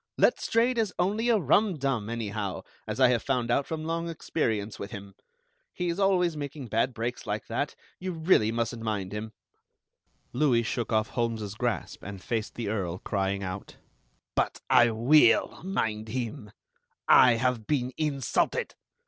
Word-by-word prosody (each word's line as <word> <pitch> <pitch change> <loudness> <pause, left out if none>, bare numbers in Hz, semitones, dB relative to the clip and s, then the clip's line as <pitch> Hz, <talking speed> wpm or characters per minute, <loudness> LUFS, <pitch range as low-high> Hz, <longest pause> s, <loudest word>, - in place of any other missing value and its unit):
Letstrayed 235 +2 +2
is 215 -4 0
only 210 +6 +1
a 230 - +5
rumdum, 140 - +1
anyhow, 105 -4 -3 0.2
as - - -4
I 130 -2 +6
have 120 -3 +2
found 125 -3 0
out 140 +3 +1
from 160 -1 -4
long 165 +1 -2
experience 110 -10 -2
with 100 - -5
him. 100 -1 -9 0.6
He's 175 0 -2
always 180 -4 +3
making 145 -3 -6
bad 115 +4 +1
breaks 120 +2 -4
like - - -2
that. - - -2 0.2
You 185 0 -3
really 160 - +3
mustn't 115 0 -2
mind 105 -4 -2
him." 110 +1 -5 1.0
Louis 125 -3 +3
shook 115 +1 -3
off 110 0 +1
Holmes's 115 -4 -2
grasp, 120 +1 -3
and 100 0 -7
faced 110 +2 -3
the 115 -3 -4
Earl, 95 -5 -2
crying 100 0 -2
out: 95 +1 -6 0.6
"But - - 0
I 120 - +7
will 120 +3 +4
mind 110 - -2
him. 110 -2 -4 0.6
I 125 -2 +8
have 115 -1 0
been 130 -3 0
insulted. 140 -5 0
120 Hz, 150 wpm, -28 LUFS, 110-155 Hz, 1.0 s, I